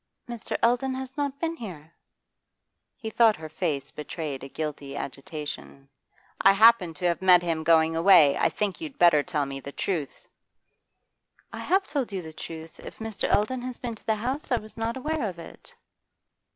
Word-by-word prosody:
'Mr. 235 -2 -4
Eldon 250 +3 +2
has 265 0 -6
not 280 -1 -2
been 330 0 -1
here.' 170 - -9 1.0
He 220 -2 -6
thought 225 -1 +5
her 155 0 -8
face 155 -4 -2
betrayed 150 -3 -5
a 135 - -8
guilty 145 -2 -5
agitation. 140 0 -7 0.6
'I 195 - +8
happen 205 -5 +5
to 165 - -5
have 170 0 +1
met 180 -2 +6
him 165 -2 -1
going 160 0 +4
away. 165 -4 +6
I - - +2
think 205 - -2
you'd 305 -4 -7
better 170 -4 +6
tell 150 -3 -1
me 135 0 -6
the 140 - -8
truth.' 155 -3 -3 1.3
'I - - -6
have 385 +1 +1
told 270 -7 -2
you 190 -2 -4
the 160 0 -9
truth. 160 0 -9
If - - -10
Mr. 225 -2 -3
Eldon 245 +5 +1
has 250 0 -5
been 240 -2 -4
to 220 - -15
the 220 - +3
house, 255 +8 -4
I - - +5
was 215 -1 -10
not 230 +2 -2
aware 310 +4 -2
of 190 -5 -3
it. 165 - -13
185 Hz, 180 wpm, -26 LUFS, 155-235 Hz, 1.3 s, I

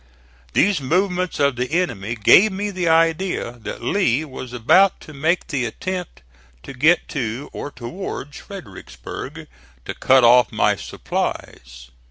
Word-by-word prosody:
These 190 -3 +2
movements 180 +5 0
of 140 -3 +2
the 125 +2 -2
enemy 120 - -1
gave 185 - +6
me 205 +2 -3
the 180 -3 -2
idea 165 -3 +1
that - - -7
Lee 155 -7 +1
was 130 -3 -9
about 180 +12 +4
to 155 - -12
make 160 +5 0
the 135 -4 -2
attempt 180 - -5 0.4
to - - -9
get 155 +7 +3
to, 130 -1 -4
or - - -5
towards, 145 +1 -7
Fredericksburg 155 - -9 0.4
to - - -4
cut 130 -1 +4
off 125 +1 +6
my - - +2
supplies. 60 0 -5
145 Hz, 140 wpm, -21 LUFS, 125-180 Hz, 0.4 s, gave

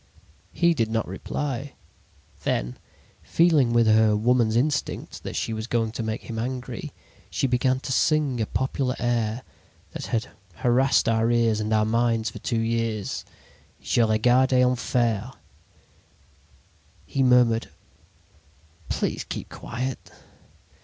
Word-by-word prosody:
"He 170 -1 +3
did 115 -8 0
not 115 -1 -1
reply. 135 +8 -4 0.7
Then, - - -2 0.4
feeling 160 -8 +3
with 120 -1 +4
her 110 -1 +4
woman's 115 0 +2
instinct 145 +4 -1
that - - -6
she 115 - -2
was 110 +1 -4
going 115 -2 0
to 115 - -5
make 110 0 -3
him 115 -1 -5
angry, 125 +1 -5 0.4
she - - -1
began 130 0 +1
to 135 - -5
sing 145 -3 +2
a 110 - -1
popular 130 0 -1
air 120 0 -1 0.5
that - - -6
had 115 +2 -2 0.3
harassed 125 +7 +2
our 115 0 +2
ears 115 -2 +2
and 105 0 -2
our 110 -1 +3
minds 115 -1 +1
for - - -9
two 115 -3 -1
years: 115 -2 -2 0.6
"'Je - - +1
regardais 125 +4 +4
en 125 0 +2
fair.' 120 -1 -1 1.7
"He 135 - -2
murmured: 125 -3 +4 1.2
"'Please - - -1
keep - - -6
quiet.' 125 +2 -5
120 Hz, 130 wpm, -25 LUFS, 110-130 Hz, 1.7 s, with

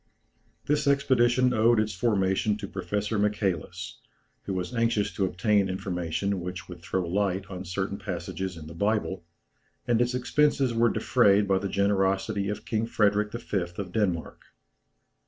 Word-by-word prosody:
This 150 0 +1
expedition 125 -2 +3
owed 115 0 +4
its 110 0 0
formation 100 0 +1
to 100 -2 -6
Professor 100 +3 -2
Michälis, 100 -5 -1 0.5
who 95 - -3
was 90 +5 -3
anxious 115 -3 +1
to 95 - 0
obtain 100 +1 +1
information 95 0 -2
which 90 -1 -6
would 90 -2 -10
throw 90 0 -2
light 95 +1 0
on 95 0 -6
certain 95 +2 -3
passages 95 -1 -4
in 80 - -9
the 80 - -9
Bible, 100 -1 -1 0.6
and 120 -1 +3
its 120 +1 +1
expenses 135 0 +2
were 115 +1 +3
defrayed 105 -6 +3
by 95 -1 +3
the 100 0 -3
generosity 100 +1 +1
of 105 - -5
King 110 0 -1
Frederick 105 -1 +2
V. 120 -3 -3 0.2
of 95 -3 -5
Denmark. 90 -6 -1
100 Hz, 150 wpm, -27 LUFS, 95-110 Hz, 0.6 s, owed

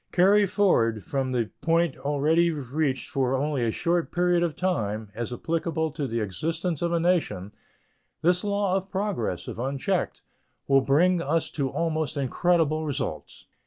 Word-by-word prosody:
Carried 200 +2 +4
forward 115 - +2
from 135 -2 -2
the 120 -4 -1
point 165 -3 +2
already 150 +4 +2
reached 140 -2 -2
for 135 -1 0
only 140 -1 0
a 115 - +1
short 170 +8 0
period 175 0 +2
of 170 -4 0
time, 110 - -2
as 120 +2 -4
applicable 160 +3 -2
to 145 -2 -3
the 115 -1 -2
existence 160 - -2
of 170 0 0
a 170 - +2
nation, 155 - 0 0.7
this 180 +3 +3
law 200 -2 0
of 195 0 -2
progress, 190 - -2
if - - -6
unchecked, 135 +2 -2 0.4
will 135 -1 +5
bring 170 +7 +3
us 160 +2 0
to 140 -4 -1
almost 155 -1 -1
incredible 155 +3 +1
results. 145 -4 -4
155 Hz, 155 wpm, -26 LUFS, 130-175 Hz, 0.7 s, will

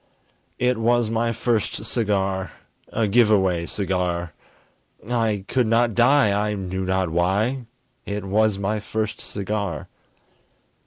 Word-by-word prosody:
It 125 -1 +1
was 120 0 +2
my 115 +1 +1
first 115 -2 -1
cigar! 95 -5 -1 0.4
A 110 -1 +1
give 115 +2 +4
away 95 -5 +2
cigar! 90 -4 -2 0.7
I 110 -5 0
could 125 -3 +1
not 115 +1 +3
die 120 0 +4 0.2
I 105 - -1
knew 95 -1 -3
not 95 -2 0
why 105 +9 0 0.4
It 100 -1 -3
was 105 +1 +2
my 105 +2 -1
first 110 +1 -3
cigar! 100 -5 -4
105 Hz, 120 wpm, -23 LUFS, 95-115 Hz, 0.7 s, give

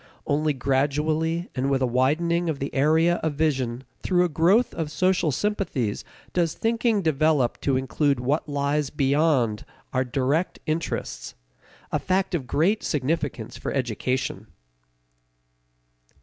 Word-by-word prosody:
Only 150 +1 +1
gradually 150 +5 0
and 130 +2 -1
with 135 -1 +1
a - - +4
widening 160 +8 +1
of 155 - -1
the 140 +1 -4
area 160 +5 +3
of 160 -2 -2
vision 135 -5 0 0.2
through 180 -1 +2
a - - -1
growth 185 +10 +3
of 160 -2 -3
social 175 +1 +1
sympathies 140 - -1 0.3
does 170 -3 +1
thinking 225 -2 +1
develop 155 -4 +2
to 135 -2 +1
include 135 +2 0
what 145 +5 -1
lies 145 0 0
beyond 140 -6 +1 0.3
our 130 0 +2
direct 135 +7 0
interests: 155 - -3 0.6
a - - +1
fact 190 0 0
of 145 -8 -2
great 190 - +2
significance 145 -5 -2
for - - -4
education. 125 -3 -2
150 Hz, 130 wpm, -25 LUFS, 130-165 Hz, 0.6 s, a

